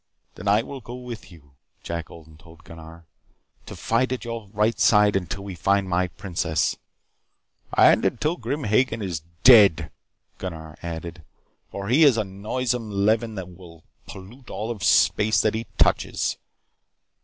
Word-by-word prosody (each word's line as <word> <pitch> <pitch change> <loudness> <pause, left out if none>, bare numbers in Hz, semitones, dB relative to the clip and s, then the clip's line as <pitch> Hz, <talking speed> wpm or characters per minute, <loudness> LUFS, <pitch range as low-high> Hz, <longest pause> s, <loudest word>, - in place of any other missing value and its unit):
"Then 105 - -9
I 105 +3 +3
will 135 +1 -8
go 120 +2 -9
with 120 -5 -9
you," 75 -5 -17 0.3
Jack 85 -1 -5
Odin 80 -1 -14
told 80 0 -18
Gunnar. 80 0 -13 0.6
"To - - -8
fight 125 +3 0
at 125 -3 -4
your 115 -2 -6
right 105 +3 0
side 105 -2 +4
until 95 +1 -3
we 100 -1 -7
find 100 +3 +1
my 90 0 0
princess 85 -2 -2 0.5
" - - -34
"And - - +6
until 155 +4 0
Grim 150 -4 -4
Hagen 110 0 +1
is 85 -6 -4 0.2
dead," 105 -9 +6 0.5
Gunnar 80 -4 -7
added. 85 0 -7 0.5
"For 100 0 -6
he 135 +8 +4
is 140 -6 +5
a 110 - +1
noisome 115 +4 -3
leaven 110 +3 0
that 95 -2 -6
will 85 -3 -15 0.2
pollute 115 +7 -12
all 110 +2 -4
of 105 -4 -7
space 110 +1 +3
that 110 - +1
he 110 0 -4
touches." - - +1
100 Hz, 155 wpm, -24 LUFS, 85-115 Hz, 0.6 s, And